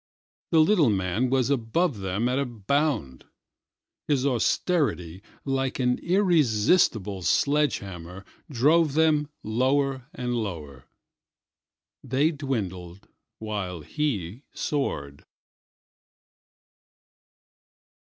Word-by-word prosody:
The 160 -2 +5
little 165 - +4
man 100 +5 0
was 130 0 +1
above 135 - 0
them 95 +5 -1
at 125 +2 0
a 140 - 0
bound. 120 - -1 0.8
His 140 -3 +1
austerity, 120 - 0 0.2
like 135 -1 -1
an 125 -1 +1
irresistible 130 - +2
sledge 145 - +2
hammer, 90 0 -9 0.2
drove 150 +3 +3
them 155 -2 +3
lower 130 +3 0
and 125 -1 -3
lower:They 110 - -6
dwindled 100 - -5 0.3
while 100 -6 -4
he 110 - -3
soared. 70 - -3
125 Hz, 85 wpm, -26 LUFS, 95-145 Hz, 0.8 s, The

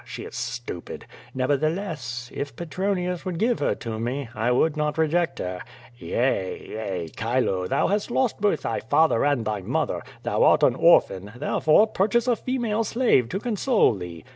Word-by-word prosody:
She - - -8
is - - -9
stupid. 120 -7 -6 0.3
Nevertheless, 140 -2 -2
if 140 -4 -5
Petronius 180 +2 -2
would 185 -3 -4
give 235 +5 +1
her - - +1
to 110 -2 -5
me, 125 +2 -3
I 115 +2 0
would 150 +5 +2
not 150 0 -1
reject 160 -3 +1
her. 90 0 -4 0.3
Yea! 120 -5 -1
yea! 95 -6 -4
Chilo, 110 -5 0
thou - - +1
hast 205 +3 -1
lost 240 -3 0
both 205 -1 +2
thy - - -1
father 160 -7 +2
and 140 -5 +1
thy 105 -2 -2
mother. - - -1 0.2
Thou - - 0
art - - +5
an - - +5
orphan; 100 +2 +3
therefore, 155 - +3
purchase 225 +3 +1
a 245 - +3
female 230 -3 -1
slave 225 - +2
to 195 - -2
console 235 - +2
thee. 90 -4 -8
145 Hz, 165 wpm, -24 LUFS, -, 0.3 s, art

